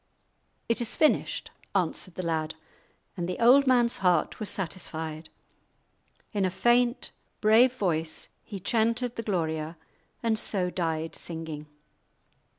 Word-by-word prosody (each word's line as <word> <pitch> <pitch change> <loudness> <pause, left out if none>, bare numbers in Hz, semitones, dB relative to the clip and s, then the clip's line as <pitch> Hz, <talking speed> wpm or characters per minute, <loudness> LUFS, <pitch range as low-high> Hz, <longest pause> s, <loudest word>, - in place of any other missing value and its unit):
"It 230 +1 +1
is 235 - +1
finished," 310 - +1 0.2
answered 180 -1 0
the 185 - -4
lad, 160 -1 -1 0.6
and 175 -2 -3
the 180 - -2
old 260 +4 +6
man's 240 -2 +4
heart 180 -4 +2
was 215 - -3
satisfied. 160 -3 -4 1.0
In 205 -2 +1
a 185 - +2
faint, 240 +5 +2 0.3
brave 225 +4 +5
voice 165 -9 -1
he 200 -3 -7
chanted 230 +4 +1
the - - -3
Gloria, 160 -6 -2 0.5
and 225 -2 +2
so 185 -4 0
died 165 -2 -2
singing. 160 -3 -6
185 Hz, 125 wpm, -28 LUFS, 160-230 Hz, 1.0 s, old